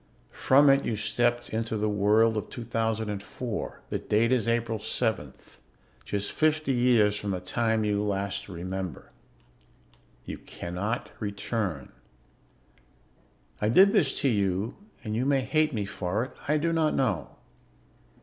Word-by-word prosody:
From 140 Hz, +2 st, +4 dB
it 135 Hz, 0 st, +3 dB
you 115 Hz, -, -1 dB
stepped 120 Hz, +3 st, 0 dB
into 115 Hz, 0 st, -2 dB
the 105 Hz, +1 st, 0 dB
world 105 Hz, +2 st, +3 dB
of 105 Hz, -, -3 dB
2004. 115 Hz, -1 st, -3 dB
The -, -, -1 dB
date 115 Hz, +3 st, +1 dB
is 125 Hz, -4 st, +2 dB
April 115 Hz, -1 st, 0 dB
7th, 105 Hz, -, -3 dB, 0.5 s
just 100 Hz, 0 st, -2 dB
fifty 155 Hz, -2 st, +1 dB
years 120 Hz, -5 st, +4 dB
from 105 Hz, 0 st, -3 dB
the 95 Hz, -2 st, -1 dB
time 110 Hz, +4 st, 0 dB
you 105 Hz, -1 st, +1 dB
last 100 Hz, -1 st, -2 dB
remember. 95 Hz, 0 st, -5 dB, 1.1 s
"You -, -, -6 dB
cannot 95 Hz, +7 st, -4 dB
return. 100 Hz, -, -3 dB, 1.7 s
"I 105 Hz, -, +2 dB
did 190 Hz, -, +6 dB
this 135 Hz, -6 st, +2 dB
to 140 Hz, -, +2 dB
you 100 Hz, -1 st, 0 dB, 0.3 s
and 110 Hz, -1 st, -3 dB
you 120 Hz, -, 0 dB
may 140 Hz, -1 st, +3 dB
hate 155 Hz, +4 st, +1 dB
me 105 Hz, -6 st, -2 dB
for 100 Hz, +2 st, -2 dB
it; 130 Hz, -, -7 dB, 0.2 s
I 150 Hz, +2 st, +3 dB
do 165 Hz, +2 st, 0 dB
not 160 Hz, -2 st, +2 dB
know. 105 Hz, -, -1 dB
110 Hz, 140 wpm, -27 LUFS, 100-125 Hz, 1.7 s, did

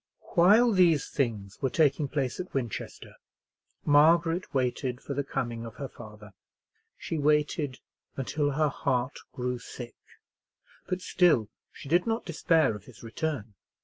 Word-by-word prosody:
While 210 Hz, +7 st, +6 dB
these 175 Hz, -7 st, +4 dB
things 110 Hz, -7 st, -2 dB
were 135 Hz, -, +1 dB
taking 150 Hz, -1 st, +2 dB
place 135 Hz, -3 st, -2 dB
at 180 Hz, -4 st, -6 dB
Winchester, 120 Hz, -5 st, -5 dB, 0.7 s
Margaret 165 Hz, +4 st, +4 dB
waited 125 Hz, -1 st, -1 dB
for 140 Hz, -, -6 dB
the 140 Hz, +1 st, -1 dB
coming 120 Hz, -3 st, -3 dB
of 115 Hz, 0 st, -9 dB
her 140 Hz, 0 st, -5 dB
father. 105 Hz, -4 st, -13 dB, 0.6 s
She 160 Hz, -, -4 dB
waited 150 Hz, -1 st, +1 dB, 0.4 s
until 145 Hz, +2 st, -1 dB
her 155 Hz, +1 st, +2 dB
heart 130 Hz, -1 st, -1 dB
grew 125 Hz, -1 st, -3 dB
sick, 120 Hz, 0 st, -9 dB, 0.9 s
but 185 Hz, 0 st, -3 dB
still 155 Hz, -, +3 dB, 0.2 s
she -, -, -11 dB
did 175 Hz, +8 st, +2 dB
not 225 Hz, +1 st, -1 dB
despair 160 Hz, -6 st, +2 dB
of 105 Hz, -, -11 dB
his 125 Hz, -, -15 dB
return. 115 Hz, -2 st, -4 dB
140 Hz, 140 wpm, -28 LUFS, 125-165 Hz, 0.9 s, While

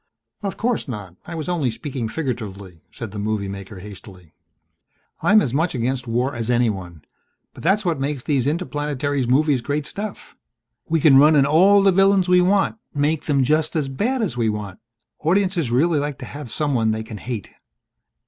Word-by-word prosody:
"Of 200 Hz, -1 st, -4 dB
course 240 Hz, -5 st, -1 dB
not 105 Hz, -8 st, -7 dB
I 170 Hz, -, -6 dB
was 155 Hz, -2 st, -5 dB
only 165 Hz, -8 st, 0 dB
speaking 125 Hz, -1 st, -4 dB
figuratively," 100 Hz, -, -5 dB
said 115 Hz, -4 st, -7 dB
the 105 Hz, -, -6 dB
movie 105 Hz, -1 st, -2 dB
maker 100 Hz, 0 st, -8 dB
hastily. 95 Hz, -4 st, -12 dB, 0.9 s
"I'm 215 Hz, +1 st, +5 dB
as 125 Hz, -, -3 dB
much 160 Hz, +2 st, 0 dB
against 125 Hz, +1 st, -2 dB
war 125 Hz, +4 st, 0 dB
as 120 Hz, -1 st, -4 dB
anyone. 95 Hz, -10 st, -1 dB, 0.5 s
But -, -, -12 dB
that's 195 Hz, +5 st, +2 dB
what 165 Hz, -5 st, 0 dB
makes 140 Hz, -1 st, -2 dB
these 135 Hz, -4 st, 0 dB
interplanetary 145 Hz, -4 st, -1 dB
movies 140 Hz, +1 st, +3 dB
great 145 Hz, +3 st, -2 dB
stuff. 205 Hz, +6 st, -6 dB, 0.6 s
We 165 Hz, -1 st, +1 dB
can 140 Hz, -3 st, +7 dB
run 150 Hz, +2 st, +6 dB
in 140 Hz, -2 st, +5 dB
all 190 Hz, +7 st, +5 dB
the 195 Hz, -, +5 dB
villains 195 Hz, 0 st, +4 dB
we 180 Hz, 0 st, +5 dB
want 195 Hz, +4 st, +2 dB, 0.2 s
make 145 Hz, +2 st, 0 dB
them 140 Hz, -3 st, +2 dB
just 155 Hz, +4 st, +1 dB
as 145 Hz, -4 st, 0 dB
bad 230 Hz, -, -1 dB
as 180 Hz, -, -2 dB
we 115 Hz, -2 st, +1 dB
want. 105 Hz, -3 st, -5 dB, 0.4 s
Audiences 180 Hz, -3 st, +1 dB
really 150 Hz, +6 st, +2 dB
like 145 Hz, -2 st, -3 dB
to -, -, -8 dB
have 145 Hz, -3 st, -8 dB
someone 130 Hz, -7 st, 0 dB
they 110 Hz, 0 st, -1 dB
can 110 Hz, -1 st, -8 dB
hate." 115 Hz, -3 st, -6 dB
140 Hz, 180 wpm, -22 LUFS, 115-165 Hz, 0.9 s, can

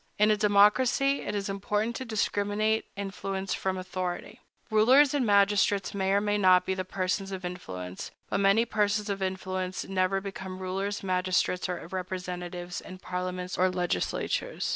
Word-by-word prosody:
In 210 Hz, +1 st, +5 dB
a -, -, +4 dB
democracy, 210 Hz, +7 st, +4 dB
it 210 Hz, -, -4 dB
is 200 Hz, -1 st, -2 dB
important 210 Hz, +3 st, -1 dB
to 260 Hz, -, -5 dB
discriminate 215 Hz, 0 st, 0 dB
influence 195 Hz, -1 st, -3 dB
from 190 Hz, -1 st, -2 dB
authority. 185 Hz, +4 st, -4 dB, 0.3 s
Rulers 255 Hz, +7 st, +6 dB
and 270 Hz, -5 st, +1 dB
magistrates 200 Hz, -1 st, +3 dB
may 190 Hz, -1 st, 0 dB
or 200 Hz, -, +4 dB
may 205 Hz, 0 st, 0 dB
not 185 Hz, -2 st, +5 dB
be 190 Hz, -, 0 dB
persons 185 Hz, +1 st, -2 dB
of 185 Hz, -1 st, -5 dB
influence; 95 Hz, -, -6 dB, 0.2 s
but -, -, -1 dB
many 200 Hz, +4 st, +4 dB
persons 210 Hz, -1 st, 0 dB
of 195 Hz, 0 st, -4 dB
influence 185 Hz, 0 st, -3 dB
never 190 Hz, 0 st, +1 dB
become 190 Hz, -1 st, -7 dB
rulers, 195 Hz, +2 st, -3 dB
magistrates, 185 Hz, -1 st, 0 dB
or 180 Hz, -2 st, -4 dB
representatives 180 Hz, -1 st, -5 dB
in 185 Hz, -, -10 dB
parliaments 180 Hz, 0 st, -4 dB
or 185 Hz, +1 st, +4 dB
legislatures. 180 Hz, -, -1 dB
195 Hz, 150 wpm, -28 LUFS, 185-205 Hz, 0.3 s, Rulers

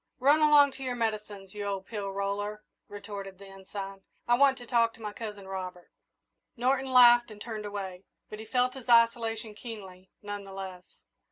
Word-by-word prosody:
"Run 285 Hz, +4 st, +4 dB
along 295 Hz, -2 st, +7 dB
to 270 Hz, -, -9 dB
your 250 Hz, -1 st, -2 dB
medicines, 210 Hz, -4 st, -3 dB
you 210 Hz, -1 st, -5 dB
old 195 Hz, -1 st, -3 dB
pill 205 Hz, -2 st, -4 dB
roller," 205 Hz, +2 st, -3 dB, 0.2 s
retorted 200 Hz, -2 st, -8 dB
the 200 Hz, -, -12 dB
Ensign; 195 Hz, 0 st, -8 dB, 0.3 s
"I 240 Hz, -, +4 dB
want 270 Hz, +1 st, +5 dB
to 245 Hz, -, -10 dB
talk 230 Hz, -1 st, +2 dB
to -, -, -19 dB
my 210 Hz, -1 st, -4 dB
cousin 210 Hz, -4 st, -7 dB
Robert." 185 Hz, -2 st, -6 dB, 0.7 s
Norton 260 Hz, +2 st, +1 dB
laughed 240 Hz, -1 st, +7 dB
and 215 Hz, -1 st, -11 dB
turned 215 Hz, -1 st, -5 dB
away, 195 Hz, -2 st, -6 dB, 0.2 s
but 215 Hz, -, -9 dB
he 220 Hz, -, -8 dB
felt 250 Hz, +2 st, +1 dB
his 260 Hz, -2 st, -10 dB
isolation 230 Hz, -2 st, +3 dB
keenly, 195 Hz, -5 st, -10 dB
none 205 Hz, 0 st, -5 dB
the 195 Hz, -1 st, -11 dB
less. 190 Hz, -2 st, -8 dB
210 Hz, 180 wpm, -29 LUFS, 195-240 Hz, 0.7 s, along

